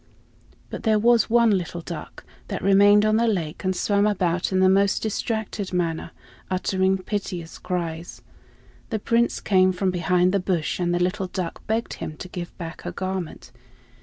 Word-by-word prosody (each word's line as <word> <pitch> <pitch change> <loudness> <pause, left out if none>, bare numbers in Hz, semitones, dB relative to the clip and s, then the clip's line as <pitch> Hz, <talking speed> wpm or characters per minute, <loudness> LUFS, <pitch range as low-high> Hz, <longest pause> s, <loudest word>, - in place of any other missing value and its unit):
But - - -5
there 220 -1 +3
was 235 +2 +4
one 235 -1 +4
little 175 -2 -3
duck, 165 -2 -8 0.2
that - - -4
remained 205 +2 +6
on 215 0 +3
the 235 +1 +2
lake 175 -8 -2
and 185 0 0
swam 205 +3 +2
about 180 -4 0
in 185 - +2
the 185 - +5
most 195 +1 +3
distracted 220 -2 -3
manner, 170 -2 -1 0.4
uttering 190 +1 +1
piteous 185 -3 -5
cries. 170 -2 -4 0.7
The 220 - -1
Prince 230 +3 +1
came 185 -2 +3
from 185 +1 0
behind 180 0 +2
the 200 - +3
bush 180 -4 -1
and 175 -1 0
the 175 - +1
little 185 +2 0
duck 180 -2 -5
begged 225 +1 -1
him 155 - -6
to 180 - -7
give 175 -1 -7
back 165 -2 -7
her - - -5
garment. 185 -3 -5
185 Hz, 170 wpm, -24 LUFS, 175-205 Hz, 0.7 s, remained